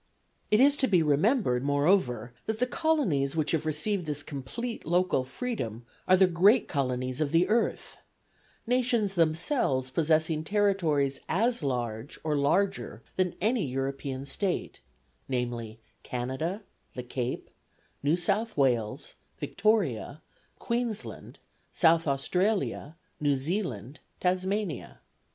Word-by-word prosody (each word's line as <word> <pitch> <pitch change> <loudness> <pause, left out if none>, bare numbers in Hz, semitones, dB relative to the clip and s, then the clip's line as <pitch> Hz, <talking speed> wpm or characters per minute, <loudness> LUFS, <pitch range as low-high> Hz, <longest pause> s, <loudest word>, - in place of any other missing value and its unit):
It 210 - +4
is 280 +2 +5
to 265 - +2
be 180 -5 +4
remembered, 150 - +2
moreover, 140 - +1
that 220 0 -1
the 250 - +2
colonies 250 - +1
which 155 -2 0
have 155 -1 0
received 165 +4 -1
this 145 -1 -2
complete 195 - -5
local 175 -4 +2
freedom 130 - -4 0.2
are 185 - +6
the 190 - +6
great 190 +7 +4
colonies 130 -2 -2
of 150 - +1
the 170 +2 +4
earth 225 +1 0 0.7
nations 235 -4 +1
themselves 155 - +1
possessing 155 +1 +1
territories 165 -9 +1
as 230 +7 +1
large 120 -3 -3
or 155 -1 0
larger 185 +8 0
than 185 -2 0
any 220 +3 +1
European 135 +1 -3
State 185 +6 -2 0.5
namely, 120 -3 -3 0.2
Canada, 130 - -3 0.3
the 125 - -4
Cape, 125 0 -4 0.5
New 150 +4 +2
South 210 +4 -1
Wales, 120 -6 0 0.2
Victoria, 165 - 0 0.3
Queensland, 235 -2 -3 0.3
South 165 -1 +4
Australia, 175 +3 0 0.2
New 145 -2 +2
Zealand, 135 - -3 0.2
Tasmania. 185 +1 -1
160 Hz, 115 wpm, -28 LUFS, 135-205 Hz, 0.7 s, are